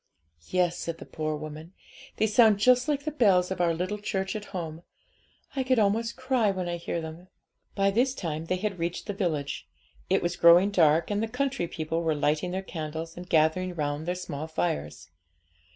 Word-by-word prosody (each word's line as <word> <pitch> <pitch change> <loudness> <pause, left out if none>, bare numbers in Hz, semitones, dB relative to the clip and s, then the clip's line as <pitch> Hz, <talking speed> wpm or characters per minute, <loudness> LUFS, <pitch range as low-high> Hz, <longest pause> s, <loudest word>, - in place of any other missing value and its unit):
'Yes,' 180 -1 +1
said 165 -1 -4
the - - -10
poor 155 -1 -3
woman; 155 +3 -8 0.4
'they 220 - +3
sound 220 -1 +5
just 250 +4 +4
like 290 -1 -1
the 305 - -1
bells 190 -10 +3
of 185 -1 -1
our 170 -1 +3
little 185 +5 -2
church 190 -1 -2
at 210 -1 -5
home; 165 -5 -6 0.7
I 270 - +1
could 255 0 +2
almost 225 +2 +1
cry 255 -4 +1
when 185 -2 -2
I 175 0 -2
hear 170 0 -3
them.' 160 +3 -8 0.5
By 195 0 +3
this 250 +5 +2
time 160 - -4
they 185 - 0
had 195 -1 -3
reached 170 +1 -3
the 205 - -3
village. 155 -8 -2 0.4
It - - +2
was 175 +1 -1
growing 175 +4 +7
dark, 165 -1 +3
and 205 0 0
the 225 - 0
country 250 -5 -1
people 165 +1 -3
were 160 -2 +1
lighting 150 +4 0
their 190 +2 -3
candles, 160 -1 -5
and 180 +1 -9
gathering 165 +3 +2
round 150 0 -2
their 180 - 0
small 155 -4 -5
fires. 155 - -3
180 Hz, 195 wpm, -27 LUFS, 160-210 Hz, 0.7 s, growing